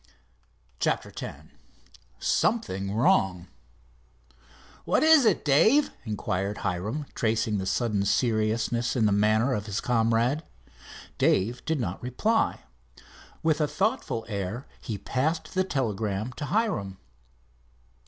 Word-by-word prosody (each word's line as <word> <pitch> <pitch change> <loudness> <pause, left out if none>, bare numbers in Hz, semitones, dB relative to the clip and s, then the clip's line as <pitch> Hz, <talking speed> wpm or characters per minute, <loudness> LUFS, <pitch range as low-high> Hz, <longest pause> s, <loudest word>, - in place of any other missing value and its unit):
CHAPTER - - -1
X - - -5 0.9
SOMETHING 100 - 0
WRONG 95 -6 +2 1.3
"What - - +2
is 315 -4 +7
it, 195 - +1
Dave?" 220 - +4
inquired 100 -2 -2
Hiram, 105 +11 -2
tracing 110 -2 0
a 95 - -4
sudden 100 0 0
seriousness 115 +1 +1
in 115 -4 +2
the 105 - +3
manner 110 +5 +3
of 105 -2 -3
his 100 -2 -2
comrade. 120 +4 +1 0.8
Dave 115 +6 +2
did 160 -2 0
not 100 -6 -3
reply. 210 - 0 0.8
With 160 -1 +2
a 150 - +2
thoughtful 195 - -1
air 105 +4 -4 0.2
he 110 - -4
passed 135 - -2
the 185 - +2
telegram 110 - -2
to 145 - -5
Hiram. 180 - -1
115 Hz, 115 wpm, -27 LUFS, 100-145 Hz, 1.3 s, is